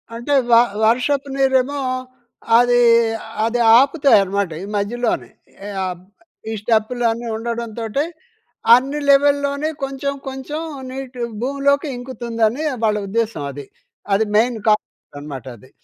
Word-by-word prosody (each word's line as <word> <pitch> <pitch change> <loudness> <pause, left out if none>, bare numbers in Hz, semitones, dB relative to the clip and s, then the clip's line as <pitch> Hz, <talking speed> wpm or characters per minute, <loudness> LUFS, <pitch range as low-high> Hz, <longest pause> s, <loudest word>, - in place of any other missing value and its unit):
అంటే 240 +5 -2 0.2
వ - - +6 0.3
వర్షపు 270 +4 +1
నీరేమో 270 +1 +1 0.8
అది, 245 0 +4 0.6
అది 235 +2 -1 0.2
ఆపుతాయి 280 -1 +4
అన్నమాట 195 -1 -2
ఈ - - -5
మధ్యలోనే. 230 +4 -2 0.5
ఆహ్, 180 -2 -3 0.5
ఈ - - -2
స్టెప్పులు 225 +2 0
అన్ని 235 +1 -5
ఉండడంతోటే 230 +2 -3 0.7
అన్ని 275 +4 -1
లెవెల్‍లోనే 285 +1 +3
కొంచెం 275 +1 -3
కొంచెం 270 +4 -5 0.3
నీటి 260 -1 -7 0.2
భూమిలోకి 280 +3 +1
ఇంకుతుందని 240 0 -2 0.2
వాళ్ళ 215 -1 +2
ఉద్దేశం 220 -6 -2
అది. 140 0 -9 0.5
అది 210 +3 +3
మెయిన్ 235 +2 +3
కాన్సెప్ట్ 210 -8 -1
అనమాట 145 -4 -8
అది. 130 +4 -19
245 Hz, 115 wpm, -19 LUFS, 220-275 Hz, 0.8 s, వ